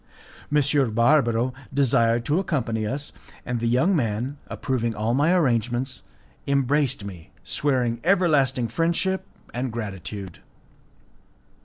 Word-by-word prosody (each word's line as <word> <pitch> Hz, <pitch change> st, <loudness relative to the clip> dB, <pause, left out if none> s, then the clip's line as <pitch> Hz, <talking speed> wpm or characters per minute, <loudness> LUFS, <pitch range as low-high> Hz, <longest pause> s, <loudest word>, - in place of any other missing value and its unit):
M. 145 Hz, -4 st, +2 dB
Barbaro 120 Hz, -1 st, +3 dB, 0.2 s
desired 120 Hz, -4 st, +2 dB
to 150 Hz, +5 st, +2 dB
accompany 115 Hz, -, -1 dB
us, 140 Hz, +5 st, -4 dB, 0.3 s
and 125 Hz, -2 st, -2 dB
the 115 Hz, -, -1 dB
young 130 Hz, +12 st, +3 dB
man, 125 Hz, +1 st, -1 dB
approving 120 Hz, -4 st, -2 dB
all 110 Hz, +3 st, 0 dB
my 145 Hz, +6 st, +3 dB
arrangements, 125 Hz, -, +1 dB, 0.5 s
embraced 140 Hz, -4 st, +1 dB
me, 90 Hz, -5 st, -9 dB
swearing 125 Hz, -5 st, 0 dB
everlasting 150 Hz, -9 st, +3 dB
friendship 170 Hz, -, 0 dB, 0.3 s
and 125 Hz, 0 st, -2 dB
gratitude. 100 Hz, -4 st, -6 dB
125 Hz, 110 wpm, -24 LUFS, 115-145 Hz, 0.5 s, Barbaro